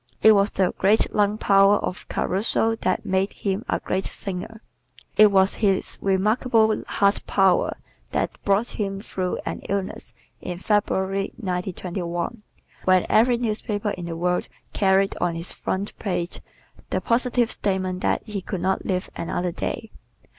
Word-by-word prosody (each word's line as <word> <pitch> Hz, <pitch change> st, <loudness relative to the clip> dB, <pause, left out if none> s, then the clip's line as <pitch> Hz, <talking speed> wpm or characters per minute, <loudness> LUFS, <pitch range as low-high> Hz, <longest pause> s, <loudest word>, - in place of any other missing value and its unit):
It 220 Hz, -, +9 dB
was 200 Hz, -1 st, +4 dB
the 185 Hz, -2 st, +1 dB
great 205 Hz, +3 st, +3 dB
lung 210 Hz, 0 st, +2 dB
power 195 Hz, -1 st, +5 dB
of 180 Hz, -, -5 dB
Caruso 225 Hz, +3 st, 0 dB
that 185 Hz, +2 st, -1 dB
made 190 Hz, 0 st, 0 dB
him 195 Hz, -1 st, -2 dB
a -, -, +1 dB
great 190 Hz, 0 st, -2 dB
singer. 210 Hz, +4 st, -6 dB, 0.5 s
It 215 Hz, -1 st, +7 dB
was 190 Hz, 0 st, +4 dB
his 195 Hz, -3 st, +1 dB
remarkable 220 Hz, +3 st, +2 dB
heart 200 Hz, 0 st, +2 dB
power 190 Hz, -3 st, +3 dB, 0.3 s
that -, -, -2 dB
brought 200 Hz, +3 st, +2 dB
him 195 Hz, -2 st, -3 dB
through 185 Hz, -3 st, -3 dB
an -, -, -3 dB
illness 195 Hz, -1 st, -3 dB, 0.3 s
in 180 Hz, -1 st, -5 dB
February, 195 Hz, -1 st, 0 dB
1921, 180 Hz, 0 st, -3 dB, 0.4 s
when 185 Hz, -1 st, +4 dB
every 240 Hz, +2 st, +4 dB
newspaper 215 Hz, -2 st, -2 dB
in 175 Hz, -3 st, -5 dB
the 165 Hz, -1 st, -5 dB
world 180 Hz, +1 st, 0 dB, 0.3 s
carried 195 Hz, 0 st, +3 dB
on 175 Hz, -1 st, +1 dB
its 165 Hz, +2 st, -3 dB
front 195 Hz, +2 st, -3 dB
page 180 Hz, -3 st, -3 dB, 0.5 s
the -, -, 0 dB
positive 240 Hz, 0 st, +1 dB
statement 185 Hz, -2 st, -1 dB
that -, -, 0 dB
he 210 Hz, -3 st, -4 dB
could 185 Hz, -1 st, -4 dB
not 190 Hz, +1 st, 0 dB
live 185 Hz, -1 st, -1 dB
another 175 Hz, +1 st, -2 dB
day. 215 Hz, +5 st, -4 dB
195 Hz, 145 wpm, -24 LUFS, 185-210 Hz, 0.5 s, It